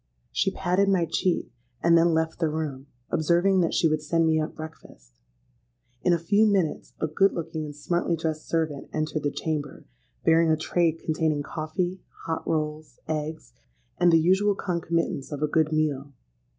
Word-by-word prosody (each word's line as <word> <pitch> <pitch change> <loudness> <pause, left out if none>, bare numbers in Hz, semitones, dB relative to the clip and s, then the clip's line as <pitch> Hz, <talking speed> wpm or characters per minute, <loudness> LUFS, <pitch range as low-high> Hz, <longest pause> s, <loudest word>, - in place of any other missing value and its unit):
She - - +1
patted 190 +1 +1
my 185 -3 +3
cheek, 175 -2 -1 0.3
and 170 0 +5
then 170 +1 +5
left 160 +1 -1
the 165 -2 +1
room, 150 -3 -4 0.2
observing 175 +4 +3
that 165 - 0
she 165 - +4
would 155 -1 0
send 165 +2 +1
me 160 -1 +3
up 155 - -4
breakfast. - - -12 0.8
In 180 - +2
a 170 - +4
few 205 +6 +3
minutes 190 -7 0
a - - 0
good 195 +6 +2
looking 160 -2 -4
and 145 -1 -8
smartly 170 +3 0
dressed 160 -1 -3
servant 160 -4 -2
entered 155 0 -1
the 145 - 0
chamber, 150 -1 -4 0.4
bearing 165 0 +5
a 155 - +3
tray 165 +1 +1
containing 155 -2 -1
coffee, 175 +5 -3 0.3
hot 160 0 -3
rolls, 155 -1 -2
eggs, 155 - -4 0.5
and 175 -1 +5
the 165 - +6
usual 190 +5 +3
concomitants 170 -6 -2
of 145 0 -3
a - - +3
good 155 0 +1
meal. 145 -3 0
160 Hz, 170 wpm, -26 LUFS, 155-170 Hz, 0.8 s, the